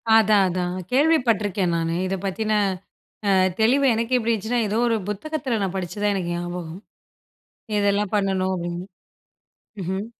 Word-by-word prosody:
அதான், 215 Hz, -2 st, +5 dB
அதான். 180 Hz, 0 st, -2 dB, 0.2 s
கேள்வி 310 Hz, +5 st, +4 dB
பட்ருக்கேன் 200 Hz, -5 st, +1 dB
நானு. 165 Hz, 0 st, -1 dB
இதை 195 Hz, +1 st, -1 dB
பத்தின 215 Hz, +3 st, -2 dB, 0.8 s
அ, -, -, +4 dB, 0.3 s
தெளிவு 260 Hz, +6 st, +4 dB
எனக்கே 230 Hz, +3 st, +1 dB
எப்டி 230 Hz, 0 st, 0 dB
இருந்ச்சுன்னா, 225 Hz, +3 st, -1 dB
ஏதோ 215 Hz, -, 0 dB
ஒரு 230 Hz, -1 st, +2 dB
புத்தகத்தில 260 Hz, +1 st, -2 dB
நான் 195 Hz, 0 st, -2 dB
படிச்சு 180 Hz, +1 st, -5 dB
தான் 205 Hz, -1 st, +2 dB
எனக்கு 175 Hz, -3 st, -2 dB
ஞாபகம். 175 Hz, 0 st, -5 dB, 1.0 s
இதெல்லாம் 205 Hz, 0 st, +1 dB
பண்ணணும் 190 Hz, -2 st, +1 dB
அப்படின்னு, 175 Hz, 0 st, -4 dB, 1.0 s
ம்ஹ்ம், 190 Hz, +3 st, -3 dB
200 Hz, 140 wpm, -23 LUFS, 180-225 Hz, 1.0 s, அதான்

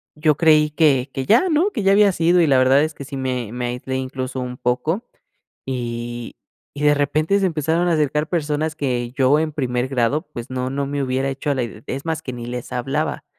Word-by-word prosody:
yo 150 Hz, 0 st, +2 dB
creí 155 Hz, -1 st, +4 dB
que 145 Hz, -4 st, +2 dB
que 135 Hz, -, -3 dB
ya 375 Hz, -, +4 dB
¿no? 335 Hz, +6 st, +2 dB
Que 225 Hz, -, -3 dB
ya 195 Hz, +1 st, +5 dB
había 205 Hz, 0 st, +5 dB
sido, 175 Hz, 0 st, +3 dB
y 165 Hz, -, +3 dB
la 135 Hz, -2 st, +4 dB
verdad 130 Hz, +3 st, +5 dB
es 155 Hz, 0 st, -2 dB
que 140 Hz, -, -9 dB
sí 140 Hz, +1 st, -7 dB
me 125 Hz, -4 st, -3 dB
me 125 Hz, 0 st, -3 dB
aislé, 125 Hz, +2 st, -4 dB
incluso, 130 Hz, 0 st, -4 dB
un 125 Hz, 0 st, -5 dB
poco 140 Hz, -, -1 dB, 0.6 s
y 120 Hz, -2 st, -5 dB, 0.4 s
y 145 Hz, -, -6 dB
de 150 Hz, 0 st, +5 dB
repente 155 Hz, +7 st, +1 dB
se 195 Hz, -, +1 dB
empezaron 165 Hz, 0 st, 0 dB
a -, -, +2 dB
acercar 150 Hz, 0 st, +1 dB
personas 155 Hz, -2 st, -1 dB
que 125 Hz, -5 st, -2 dB
yo 135 Hz, +2 st, +3 dB
en 155 Hz, 0 st, -1 dB
primer 125 Hz, -4 st, -1 dB
grado 135 Hz, +4 st, +1 dB
pues 120 Hz, +2 st, -7 dB
no 130 Hz, 0 st, -3 dB
no 140 Hz, 0 st, -2 dB
me 140 Hz, 0 st, -2 dB
hubiera 130 Hz, +1 st, -1 dB
hecho 135 Hz, +2 st, -2 dB
a -, -, +2 dB
la 130 Hz, -, -1 dB
ide 115 Hz, -1 st, -8 dB
es 135 Hz, +2 st, -4 dB
más, 160 Hz, -1 st, -2 dB
que 130 Hz, -, -5 dB
ni 120 Hz, -1 st, -7 dB
les 125 Hz, 0 st, -6 dB
hablaba. 125 Hz, +2 st, -2 dB
140 Hz, 230 wpm, -21 LUFS, 125-155 Hz, 0.6 s, ya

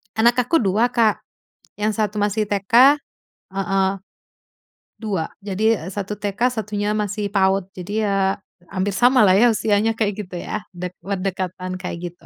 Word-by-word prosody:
Anak 240 Hz, +2 st, +3 dB
aku 330 Hz, +3 st, +2 dB
2 220 Hz, +4 st, +1 dB
Kak, 225 Hz, -3 st, +2 dB, 0.5 s
yang 215 Hz, 0 st, 0 dB
satu 210 Hz, -1 st, -1 dB
masih 205 Hz, +1 st, +1 dB
TK 230 Hz, +8 st, +4 dB, 0.5 s
heeh, 195 Hz, 0 st, +1 dB, 1.1 s
2. 195 Hz, -8 st, -3 dB
Jadi 210 Hz, +2 st, +1 dB
satu 205 Hz, +2 st, -5 dB
TK 210 Hz, +5 st, 0 dB
satunya 210 Hz, -2 st, -2 dB
masih 205 Hz, -1 st, -2 dB
PAUD. 195 Hz, -1 st, +1 dB
Jadi 205 Hz, +4 st, -3 dB
ya, 195 Hz, -1 st, +1 dB, 0.3 s
hampir 195 Hz, +1 st, -2 dB
sama 245 Hz, +4 st, +4 dB
lah 190 Hz, -, +6 dB
ya, 240 Hz, -, +6 dB
usianya 215 Hz, +1 st, +1 dB
kayak 210 Hz, -2 st, -2 dB
gitu 180 Hz, -, -9 dB
ya, 210 Hz, +4 st, -5 dB
dek 180 Hz, 0 st, -5 dB
berdekatan 185 Hz, -1 st, -4 dB
kayak 175 Hz, -1 st, -5 dB
gitu. 175 Hz, -, -24 dB
205 Hz, 145 wpm, -21 LUFS, 190-220 Hz, 1.1 s, lah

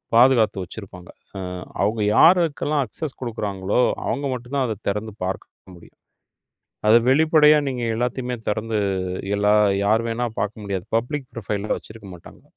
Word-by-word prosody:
பாதுகாத்து 115 Hz, -5 st, +4 dB
வச்சிருப்பாங்க. 90 Hz, -1 st, -11 dB, 0.3 s
அஹ், 90 Hz, -1 st, -6 dB, 0.2 s
அவங்க 105 Hz, +2 st, 0 dB
யாருக்கெல்லாம் 160 Hz, -4 st, +4 dB
அக்சஸ் 145 Hz, +6 st, -7 dB
கொடுக்கறாங்களோ 105 Hz, -3 st, -1 dB, 0.2 s
அவங்க 140 Hz, -, -2 dB
மட்டும்தான் 130 Hz, +2 st, -2 dB
அதைத் 110 Hz, -2 st, -6 dB
திறந்து 105 Hz, +1 st, -3 dB
பார்க்க 95 Hz, 0 st, -7 dB
முடியும். 85 Hz, -, -18 dB, 0.9 s
அதை 110 Hz, -, +7 dB
வெளிப்படையா 155 Hz, +1 st, +5 dB
நீங்க 125 Hz, -2 st, -4 dB
எல்லாத்தையுமே 125 Hz, +1 st, -2 dB
திறந்து 110 Hz, +1 st, -1 dB, 0.6 s
எல்லா 105 Hz, 0 st, +3 dB, 0.3 s
யார் 110 Hz, +2 st, +3 dB
வேணா 115 Hz, +1 st, -2 dB, 0.2 s
பாக்க 105 Hz, +1 st, -2 dB
முடியாது. 100 Hz, -2 st, -4 dB
பப்லிக் 135 Hz, +4 st, -2 dB
ப்ரொபைல் 105 Hz, -1 st, -4 dB
வச்சிருக்க 110 Hz, -2 st, -12 dB
மாட்டாங்க. 85 Hz, -, -15 dB
110 Hz, 130 wpm, -22 LUFS, 100-130 Hz, 0.9 s, அதை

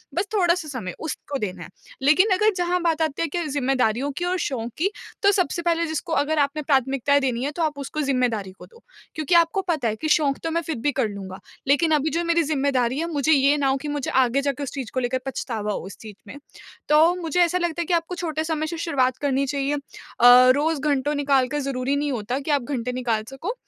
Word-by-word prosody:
बस 360 Hz, +4 st, 0 dB
थोड़ा-सा 350 Hz, -4 st, +2 dB
समय 235 Hz, -, -5 dB
उसको 290 Hz, -2 st, -5 dB
देना 185 Hz, -5 st, -4 dB
है। -, -, -11 dB, 0.3 s
लेकिन 310 Hz, +10 st, +4 dB
अगर 425 Hz, +3 st, +3 dB
जहाँ 355 Hz, 0 st, 0 dB
बात 330 Hz, -2 st, 0 dB
आती 315 Hz, -2 st, -1 dB
है 330 Hz, -, +1 dB
कि 345 Hz, +3 st, -3 dB
ज़िम्मेदारियों 265 Hz, -2 st, 0 dB
की 350 Hz, -, -1 dB
और 365 Hz, +1 st, 0 dB
शौक 240 Hz, -7 st, -3 dB
की, 360 Hz, +5 st, +1 dB, 0.3 s
तो 400 Hz, -, +6 dB
सबसे 360 Hz, -4 st, 0 dB
पहले 335 Hz, -1 st, +1 dB
जिसको 315 Hz, +1 st, -3 dB
अगर 305 Hz, +1 st, +1 dB
आपने 285 Hz, +2 st, 0 dB
प्राथमिकताएँ 275 Hz, 0 st, +2 dB
देनी 250 Hz, -2 st, -1 dB
है 285 Hz, -, -1 dB
तो 340 Hz, -, -1 dB
आप 305 Hz, -2 st, -1 dB
उसको 280 Hz, +2 st, -4 dB
ज़िम्मेदारी 250 Hz, -8 st, 0 dB
को -, -, -11 dB
दो। 465 Hz, -, -20 dB, 0.3 s
क्योंकि 310 Hz, +2 st, 0 dB
आपको 340 Hz, +3 st, +3 dB
पता 320 Hz, -10 st, -1 dB
है 215 Hz, -, -1 dB
कि 310 Hz, -, -4 dB
शौक 285 Hz, -3 st, +2 dB
तो 330 Hz, -, -2 dB
मैं 335 Hz, +1 st, 0 dB
फिर 320 Hz, -1 st, -4 dB
भी 265 Hz, +5 st, 0 dB
कर 265 Hz, -4 st, 0 dB
लूँगा, 195 Hz, -2 st, -8 dB, 0.3 s
लेकिन 290 Hz, +4 st, +3 dB
अभी 305 Hz, +1 st, +2 dB
जो 335 Hz, +3 st, -1 dB
मेरी 335 Hz, 0 st, +2 dB
ज़िम्मेदारी 275 Hz, -3 st, 0 dB
है, 335 Hz, -, -1 dB
मुझे 295 Hz, 0 st, +1 dB
ये 280 Hz, 0 st, +4 dB
ना 280 Hz, -2 st, +1 dB
हो 270 Hz, 0 st, +2 dB
कि 295 Hz, +2 st, -7 dB
मुझे 290 Hz, -2 st, -3 dB
आगे 260 Hz, +1 st, +2 dB
जाकर 280 Hz, 0 st, -2 dB
उस 275 Hz, -, -5 dB
चीज़ 265 Hz, -5 st, -5 dB
को 255 Hz, -, 0 dB
लेकर 255 Hz, +1 st, -1 dB
पछतावा 225 Hz, -5 st, -3 dB
हो -, -, -3 dB
उस 195 Hz, -, -10 dB
चीज़ 215 Hz, -2 st, -10 dB
में। 260 Hz, -, -9 dB, 0.5 s
तो 315 Hz, +4 st, +5 dB
मुझे 330 Hz, +1 st, -1 dB
ऐसा 350 Hz, +1 st, +3 dB
लगता 345 Hz, -1 st, -1 dB
है -, -, -2 dB
कि 355 Hz, -, -1 dB
आपको 340 Hz, +1 st, 0 dB
छोटे 315 Hz, -3 st, -3 dB
समय 315 Hz, -1 st, -2 dB
से 335 Hz, -, -5 dB
शुरुआत 260 Hz, -7 st, 0 dB
करनी 275 Hz, -1 st, 0 dB
चाहिए। 280 Hz, +1 st, -1 dB
अ, -, -, -3 dB, 0.8 s
रोज़ 310 Hz, +1 st, 0 dB
घंटों 290 Hz, 0 st, 0 dB
निकाल 275 Hz, -3 st, +2 dB
कर 295 Hz, +3 st, -3 dB
ज़रूरी 270 Hz, -1 st, -1 dB
नहीं 290 Hz, 0 st, -1 dB
होता 245 Hz, +2 st, -2 dB
कि 285 Hz, +2 st, -3 dB
आप 285 Hz, -1 st, +2 dB
घंटे 250 Hz, -2 st, -3 dB
निकाल 240 Hz, -3 st, -1 dB
सको। 300 Hz, -, -5 dB
285 Hz, 240 wpm, -23 LUFS, 260-325 Hz, 0.8 s, तो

